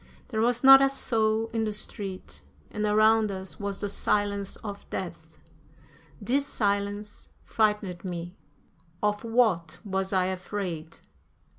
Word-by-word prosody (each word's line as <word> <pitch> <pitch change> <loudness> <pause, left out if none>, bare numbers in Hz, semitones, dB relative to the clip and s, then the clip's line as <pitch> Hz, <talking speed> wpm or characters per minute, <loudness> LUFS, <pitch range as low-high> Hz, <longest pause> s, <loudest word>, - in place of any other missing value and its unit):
There 220 -3 -1
was 240 +2 +1
not 270 0 +10
a 275 - +5
soul 225 -4 0
in 225 -1 0
the 215 -1 -1
street, 190 - -6 0.3
and 210 0 -1
around 215 0 +4
us 190 -5 -7
was 200 -1 -3
the 205 - -1
silence 200 0 -1
of 200 -2 -7
death. - - -5 0.9
This 265 +6 0
silence 205 -1 -2 0.2
frightened 210 -5 0
me. 175 -1 -5 0.7
Of 210 +1 +1
what 215 -9 +1
was 190 -1 -2
I 185 -2 +2
afraid? 185 -3 -4
205 Hz, 130 wpm, -27 LUFS, 190-220 Hz, 0.9 s, not